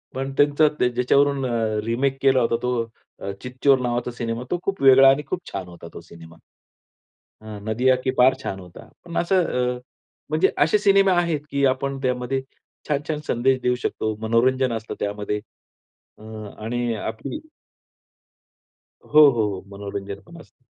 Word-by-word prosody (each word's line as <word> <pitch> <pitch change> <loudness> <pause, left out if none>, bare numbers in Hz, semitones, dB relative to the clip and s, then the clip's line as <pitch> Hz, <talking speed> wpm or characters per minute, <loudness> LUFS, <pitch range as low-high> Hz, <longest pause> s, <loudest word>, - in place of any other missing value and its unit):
पण 135 +1 -3
त्यांचा 145 +1 +4 0.2
ज्याच्यावरून 135 +3 +2
अ, 110 -3 -1
रिमेक 135 +4 0
केला 135 -1 +4
होता 115 0 +1
तो 115 -5 -4
चितचोर 130 +2 +2
नावाचा 120 0 -2
सिनेमा, 115 0 -4
तो 175 - 0
खूप 195 -6 -3
वेगळा 135 0 +8
आणि 140 +2 +2
खूप 185 - -2
छान 95 -2 -5
होता 85 -1 -11
तो - - -9
सिनेमा 85 -1 -14 1.1
हां 110 -1 -8
नदिया 125 +4 +2
के 130 - +2
पार 130 +1 +6
छान 95 - -4
होता. 90 -1 -13 0.2
पण 170 -1 -8
असं 180 +1 +2 0.3
अ, - - -8 0.5
म्हणजे 155 +5 +3
असे 160 +8 +3
सिनेमा 195 -2 +4
आहेत 165 -4 -1
की 140 0 0
आपण 135 +1 -1
त्यामध्ये 125 +1 -1 0.5
छान-छान 150 +1 -2
संदेश 130 +2 +2
देऊ 125 0 +2
शकतो, 110 -2 -2
मनोरंजन 125 +3 +2
असतं 115 0 -5
त्यामध्ये 105 0 -3 0.8
अ, - - -16 0.4
आणि 120 +1 -2
आपली 110 - -5 1.6
हो, 150 -1 +7
हो, 115 -3 0
हो. 95 - -8
मनोरंजन 100 0 -6
पण 170 -1 -13
असतं. 125 - -23
125 Hz, 150 wpm, -23 LUFS, 110-140 Hz, 1.6 s, वेगळा